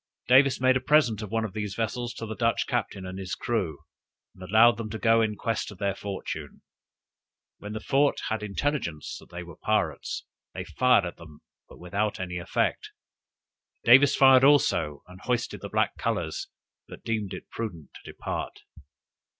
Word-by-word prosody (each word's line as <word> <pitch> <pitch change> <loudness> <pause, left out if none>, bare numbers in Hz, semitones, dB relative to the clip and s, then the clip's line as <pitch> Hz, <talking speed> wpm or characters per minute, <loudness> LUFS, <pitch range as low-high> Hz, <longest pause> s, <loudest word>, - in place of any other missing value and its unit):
Davis 130 +1 +5
made 130 0 +4
a - - +3
present 130 -7 +3
of 105 - -6
one 115 +1 0
of 105 - -7
these 105 -2 -4
vessels 120 +2 -2
to 115 - -6
the 110 0 -6
Dutch 115 +1 +1
captain 110 -6 -3
and 95 +1 -6
his 95 -1 -4
crew, 95 -11 -2 0.6
and 95 - -18
allowed 110 +5 +5
them 115 -2 -5
to 110 - -5
go 115 0 +4
in 110 -1 0
quest 115 +1 -2
of 105 - -11
their 100 +1 0
fortune. 95 -7 -6 1.0
When 105 +1 -7
the 110 - -4
fort 140 +4 +2
had 110 0 -2
intelligence 105 - -3
that - - -17
they 85 0 -7
were 85 -2 -12
pirates, - - -1 0.3
they - - -4
fired 125 -6 +3
at 85 - -6
them, 80 -3 -14 0.3
but - - -14
without 100 +4 -2
any 90 -1 -4
effect; 85 - -1 0.9
Davis 135 +4 +7
fired 130 -1 +7
also, 85 - +3
and 90 +1 -14
hoisted 120 -1 -2
the - - -6
black - - +1
colors, - - -2 0.4
but - - -12
deemed 110 -4 -2
it - - -10
prudent 85 - -6
to - - -11
depart. - - -5
110 Hz, 175 wpm, -27 LUFS, 95-120 Hz, 1.0 s, Davis